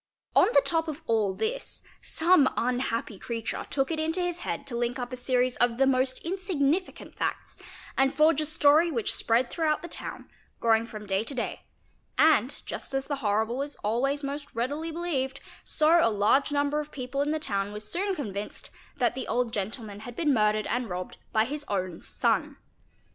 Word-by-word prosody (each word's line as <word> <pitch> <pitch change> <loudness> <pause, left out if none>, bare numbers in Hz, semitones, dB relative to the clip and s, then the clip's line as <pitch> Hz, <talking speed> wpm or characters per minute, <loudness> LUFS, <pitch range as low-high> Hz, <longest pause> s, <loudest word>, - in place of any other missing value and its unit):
On - - +7
the - - +7
top 325 -1 +1
of 310 +1 -5
all 215 -4 +1
this - - -3 0.2
some 320 -4 +4
unhappy 235 -4 -1
creature 230 -1 -4
took 270 +2 0
it 320 - -1
into 320 +3 0
his 355 -1 -1
head 280 - -4
to 265 -4 -5
link 240 +1 -1
up 245 0 -5
a - - -1
series 250 0 +1
of 240 -1 +2
the 270 - +4
most 255 -1 +2
insignificant 360 -2 -1
facts - - -3 0.4
and 270 0 +3
forge 310 0 +4
a 305 - 0
story 310 +2 +5
which 235 -9 0
_ - - -2
spread 235 +2 +1
throughout 315 -2 0
the - - -5
town, - - -6 0.3
growing 225 0 +3
from 215 -2 -8
day 195 +1 0
to 270 +5 -4
day, 245 - -4 0.5
and, 290 -4 +4
just - - -5
as 270 0 0
the 285 - -2
horrible 220 +1 0
is 290 +1 -4
always 270 +7 0
most 285 +1 -4
readily 290 +8 -2
believed, 280 -6 -2 0.2
so 320 +2 +4
a - - +5
large 215 +8 +3
number 285 +1 +1
of 300 0 -5
people 260 +1 -3
in 290 - 0
the 310 - +1
town 200 -9 -2
were 210 - -5
soon 370 - -1
convinced 205 - -5 0.3
that 245 -3 +2
the 260 0 -5
old 240 0 0
gentleman 205 0 -4
had 240 +2 -8
been 300 -1 +2
murdered 215 -2 +2
and 245 0 -1
robbed 180 0 -5
by 220 0 +3
his 295 +4 -4
own 185 -4 -2
son. - - 0
265 Hz, 190 wpm, -28 LUFS, 230-305 Hz, 0.5 s, On